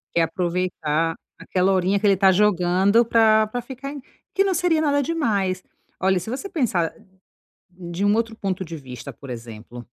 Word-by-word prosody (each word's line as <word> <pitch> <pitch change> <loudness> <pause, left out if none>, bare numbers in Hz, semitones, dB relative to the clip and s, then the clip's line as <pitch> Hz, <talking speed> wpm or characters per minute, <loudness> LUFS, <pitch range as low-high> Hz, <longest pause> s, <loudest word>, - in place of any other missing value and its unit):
Quer 170 - +4
aproveitar 165 -2 -1 0.2
aquela 185 +1 +1
horinha 190 +2 +2
que 210 - -2
ele 200 -1 +5
tá 190 0 +5
jogando 195 +2 +3
pra 220 -1 +4
pra 245 +3 -4
ficar 265 +3 -7
em 285 -1 -8 0.3
que 390 - +4
não 390 -1 +1
seria 340 -2 +2
nada 285 -2 +2
demais. 205 - -1 0.4
Olha, 190 0 +2
se 180 - -7
você 265 - -4
pensar 200 - 0 0.8
de 175 +1 -6
um 205 - +4
outro 225 0 -1
ponto 195 -3 -3
de 165 - -7
vista, 125 -4 -9
por 140 - -12
exemplo. 115 0 -9
190 Hz, 175 wpm, -23 LUFS, 175-230 Hz, 0.8 s, ele